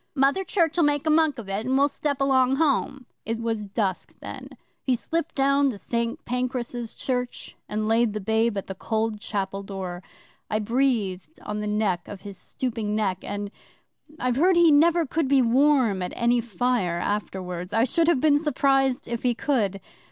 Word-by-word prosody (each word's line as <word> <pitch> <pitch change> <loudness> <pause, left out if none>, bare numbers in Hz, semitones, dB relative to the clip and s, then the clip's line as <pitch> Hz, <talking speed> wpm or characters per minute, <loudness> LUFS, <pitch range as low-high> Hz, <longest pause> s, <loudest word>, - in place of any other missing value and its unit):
"Mother 280 +7 +2
Church'll 345 -2 +1
make 290 -1 +2
a 310 - +3
monk 310 -3 +3
of 225 -4 -8
it, 195 +2 -2
and 260 +1 +2
we'll 280 +1 +4
step 285 0 -2
along 265 -1 +3
home." 275 -3 0 0.2
'It 225 0 -2
was 225 -3 -2
dusk 195 -2 -2
then. - - -8 0.3
He 255 - +2
slipped 330 +6 -3
down 275 0 +3
to 230 - -5
St 235 +3 -3
Pancras' 245 -1 -3
Church, 250 -1 -3
and 215 0 -2
laid 225 -1 +2
the 215 - -3
babe 220 +2 +1
at 195 - -3
the 190 - -6
cold 220 +2 -2
chapel 195 -2 -3
door. 190 -3 -6 0.5
I 215 - +1
breathed 230 - -1
on 210 0 -4
the 210 - -3
back 210 -5 0
of 205 - -9
his 200 -1 -8
stooping 220 +1 -3
neck 195 -4 0
and 205 0 -5 0.7
I've 250 -1 0
heard 360 +5 +4
he 340 -2 +6
never 330 +3 +4
could 305 +1 -1
be 270 -1 +4
warm 250 -5 +3
at 180 - -4
any 240 0 +2
fire 225 -5 0
afterwards. 180 -2 -3
I 225 +2 +3
should 325 +6 +1
have 340 -6 +4
been 290 0 +4
surprised 270 -4 +1
if 235 -1 -3
he 245 -2 +1
could! 215 -8 0
235 Hz, 180 wpm, -25 LUFS, 210-275 Hz, 0.7 s, he